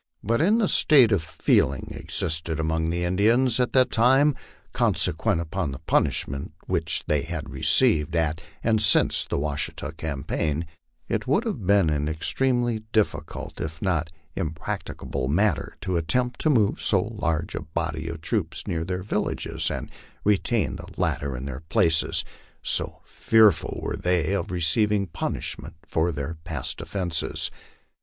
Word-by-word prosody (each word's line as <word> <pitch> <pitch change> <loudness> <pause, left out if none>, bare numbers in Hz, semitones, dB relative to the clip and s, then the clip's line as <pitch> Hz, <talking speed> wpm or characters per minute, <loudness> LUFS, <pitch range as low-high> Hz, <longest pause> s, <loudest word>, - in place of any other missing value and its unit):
But 115 +6 +1
in 205 +7 +4
the 220 -4 +2
state 130 -11 +6
of 100 -5 +3
feeling 70 -3 +1
existing 80 0 -2
among 80 +1 0
those 85 +1 -1
Indians 110 +7 +3
at 125 - +2
that 130 -1 +4
time, 135 +6 +5 0.4
consequent 85 - +1
upon 85 0 -2
the 65 - -6
punishment 70 +1 0
which - - 0
they 75 -2 +1
had 80 -1 -5
received 80 +1 +2
at 80 +1 0 0.2
and 110 -2 +2
since 105 - +3
the - - -1
Wa 75 0 -1
shita 75 +1 -3
campaign, 80 +1 -2 0.4
it - - -2
would - - +2
have 90 - -3
been 100 -5 +4
an 75 0 0
extremely 120 +8 0
difficult 110 -3 -1
if 80 0 -5
not 85 -5 0 0.3
impractica 80 +1 -4
ble 65 -2 -2
matter 95 +5 +1
to 90 -2 -1
attempt 120 +10 0
to 155 - +3
move 110 -8 +2
so - - +3
large 80 +1 -2
a - - -3
body 80 0 -3
of 85 -1 -5
troops - - -2
near 80 -1 -2
their 90 +1 -3
villages, 105 - -1
and - - -5 0.3
retain 105 +2 +1
the - - -9
latter 70 -3 -1
in 65 - -6
their 70 0 -6
places, 80 0 +2 0.4
so - - -2
fearful 110 -5 +3
were - - -2
they 90 0 +1
of 100 - -1
receiving 100 +4 +2
punish 85 -2 -3
ment - - -10
for 80 +2 0
their 75 +2 -5
past 80 -7 -4
offences. 90 -5 -3
85 Hz, 155 wpm, -25 LUFS, 80-105 Hz, 0.4 s, state